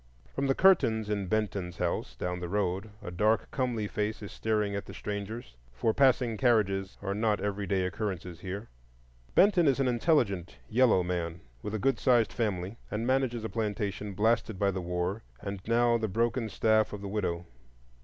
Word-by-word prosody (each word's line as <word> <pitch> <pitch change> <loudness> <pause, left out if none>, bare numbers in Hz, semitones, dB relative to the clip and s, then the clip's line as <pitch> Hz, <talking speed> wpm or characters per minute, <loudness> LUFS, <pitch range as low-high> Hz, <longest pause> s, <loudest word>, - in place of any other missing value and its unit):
From 140 - -1
the 135 - +2
curtains 120 - +4
in 100 -2 -1
Benton's 100 -3 -1
house, 90 -1 -2
down 90 0 -3
the 90 -1 -5
road, 100 +1 -1
a 90 - -5
dark 105 +5 +1
comely 120 -5 -1
face 105 +1 -2
is 100 - -7
staring 105 -2 0
at 100 - -4
the - - -9
strangers; 105 - -5 0.2
for 85 - 0
passing 125 -4 +3
carriages 100 -6 +2
are 100 0 -1
not 105 0 +1
every 100 0 -2
day 95 -2 +1
occurrences 90 -4 -4
here. 100 +4 -5 0.7
Benton 190 -5 +5
is 135 -1 +3
an 135 - +2
intelligent 120 - +1
yellow 115 -5 +4
man 85 -1 -2 0.2
with 105 +8 -4
a - - +1
good 135 +3 +1
sized 120 -4 +3
family, 105 -2 -2
and 110 +2 -2
manages 130 -3 +1
a - - -1
plantation 105 -2 -2
blasted 110 0 +1
by 100 +1 +2
the 95 -1 -3
war 90 +4 -2 0.2
and 100 -1 -5
now 120 0 +3
the 110 - -1
broken 115 +3 0
staff 110 +1 +2
of 105 - -6
the 100 - -5
widow. 90 -4 -2
105 Hz, 180 wpm, -30 LUFS, 95-115 Hz, 0.7 s, Benton